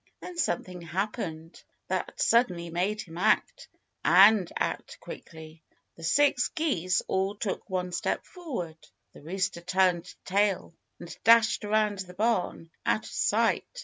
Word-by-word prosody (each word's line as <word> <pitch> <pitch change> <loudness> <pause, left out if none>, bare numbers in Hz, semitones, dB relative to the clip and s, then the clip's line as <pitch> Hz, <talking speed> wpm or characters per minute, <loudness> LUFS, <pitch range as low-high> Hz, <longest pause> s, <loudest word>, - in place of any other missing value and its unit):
Then 360 - -9
something 185 - -2
happened 170 -2 -4 0.3
that - - -3
suddenly 180 -8 +2
made 195 +5 -1
him 170 -2 -10
act 220 - +1 0.4
and 195 0 +6
act - - -3
quickly. 160 0 -11 0.3
The 165 - -13
six 265 - +3
geese 185 - 0
all 190 +2 0
took 210 0 -4
one 180 -1 -2
step 175 - -2
forward. 235 - -6 0.3
The - - -14
rooster 175 +2 -2
turned 180 -1 +1
tail 200 -2 +1 0.3
and 170 - -9
dashed 230 0 +5
around 210 -1 +1
the 180 -1 -7
barn, 195 -6 -1
out 215 - 0
of - - -9
sight. - - 0
190 Hz, 135 wpm, -28 LUFS, 170-215 Hz, 0.4 s, and